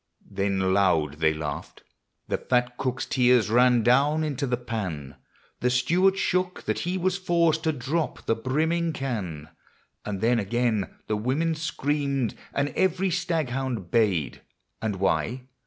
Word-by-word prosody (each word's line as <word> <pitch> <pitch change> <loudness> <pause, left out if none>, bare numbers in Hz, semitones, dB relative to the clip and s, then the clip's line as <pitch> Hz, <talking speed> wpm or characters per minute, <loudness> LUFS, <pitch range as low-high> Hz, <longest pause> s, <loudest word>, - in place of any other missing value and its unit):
Then 95 -1 0
loud 80 -7 +2
they 80 -1 +4
laughed; 75 -2 -6 0.4
the - - -1
fat 125 0 0
cook's 130 0 -2
tears 125 -4 +3
ran 120 0 +5
down 140 +6 +3
into 140 -2 -2
the 125 -1 0
pan; 95 - -5 0.4
The 125 - +1
steward 175 +10 +3
shook, 185 -1 0
that - - -1
he 180 +2 -2
was 185 +1 0
forced 170 -3 +2
to 160 - +3
drop 150 +4 -3
the - - +2
brimming 160 +8 0
can; 95 - -4 0.5
And 105 -2 -4
then 115 +3 +2
again 110 0 0 0.2
the 105 - -1
women 140 +9 0
screamed, 145 -4 -1 0.2
and 140 +1 0
every 185 +5 +1
staghound 135 - -2
bayed, 100 -10 +1 0.2
— - - -50
And 110 -2 -1
why 95 - 0
125 Hz, 145 wpm, -26 LUFS, 105-155 Hz, 0.5 s, ran